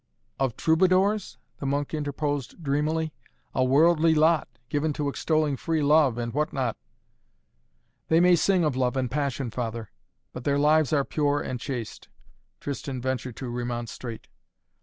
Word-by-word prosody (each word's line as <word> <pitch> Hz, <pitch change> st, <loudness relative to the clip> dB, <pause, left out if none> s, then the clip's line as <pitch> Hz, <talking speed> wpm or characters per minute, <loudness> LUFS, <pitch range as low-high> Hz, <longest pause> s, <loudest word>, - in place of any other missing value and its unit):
"Of 130 Hz, -4 st, 0 dB
Troubadours?" 185 Hz, +5 st, +2 dB, 0.2 s
the 140 Hz, -, -3 dB
monk 145 Hz, +2 st, -1 dB
interposed 145 Hz, 0 st, -3 dB
dreamily. 155 Hz, +2 st, 0 dB, 0.4 s
"A 130 Hz, -, +2 dB
worldly 160 Hz, +4 st, +4 dB
lot 155 Hz, 0 st, +3 dB, 0.2 s
given 150 Hz, +2 st, 0 dB
to 145 Hz, -1 st, -2 dB
extolling 155 Hz, 0 st, 0 dB
free 155 Hz, +6 st, -1 dB
love 145 Hz, -4 st, +4 dB
and 120 Hz, -1 st, -3 dB
what 150 Hz, +2 st, 0 dB
not 130 Hz, -5 st, -1 dB, 0.7 s
" -, -, -46 dB
"They 160 Hz, -, +5 dB
may 180 Hz, 0 st, +6 dB
sing 185 Hz, +1 st, +2 dB
of 150 Hz, -5 st, +1 dB
love 130 Hz, 0 st, 0 dB
and 125 Hz, -2 st, -1 dB
passion, 140 Hz, -3 st, -2 dB
father, 115 Hz, -1 st, -4 dB, 0.4 s
but 125 Hz, -, -7 dB
their 140 Hz, +1 st, +1 dB
lives 150 Hz, +1 st, +3 dB
are 140 Hz, -3 st, +2 dB
pure 145 Hz, -1 st, 0 dB
and 125 Hz, -, -4 dB
chaste," 120 Hz, -4 st, -6 dB, 0.5 s
Tristan 140 Hz, -2 st, -4 dB
ventured 130 Hz, -1 st, -3 dB
to 130 Hz, -, -6 dB
remonstrate. 120 Hz, -1 st, -5 dB
145 Hz, 150 wpm, -26 LUFS, 125-155 Hz, 0.7 s, may